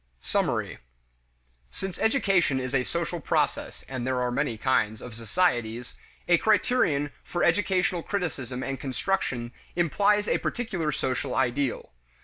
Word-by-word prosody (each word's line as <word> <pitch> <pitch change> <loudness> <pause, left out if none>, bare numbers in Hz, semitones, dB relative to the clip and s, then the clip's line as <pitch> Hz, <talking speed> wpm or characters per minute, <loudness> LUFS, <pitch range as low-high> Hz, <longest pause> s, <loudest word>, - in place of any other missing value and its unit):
Summary. - - -1 0.9
Since 190 - -6
education 195 - +3
is 130 0 -4
a 130 -2 +3
social - - -2
process, - - -1
and 130 -2 -4
there 130 -1 +1
are 125 0 0
many 120 -3 0
kinds 110 -3 +1
of 125 - -9
societies, 120 -2 0 0.3
a 175 -1 +5
criterion 185 - +2
for 175 - -2
educational 180 0 +2
criticism 130 - -3
and 135 0 -3
construction 130 -4 -1 0.2
implies 205 +5 +3
a - - +2
particular 190 -10 -2
social 130 -2 -1
ideal. 130 - 0
140 Hz, 125 wpm, -27 LUFS, 125-185 Hz, 0.9 s, a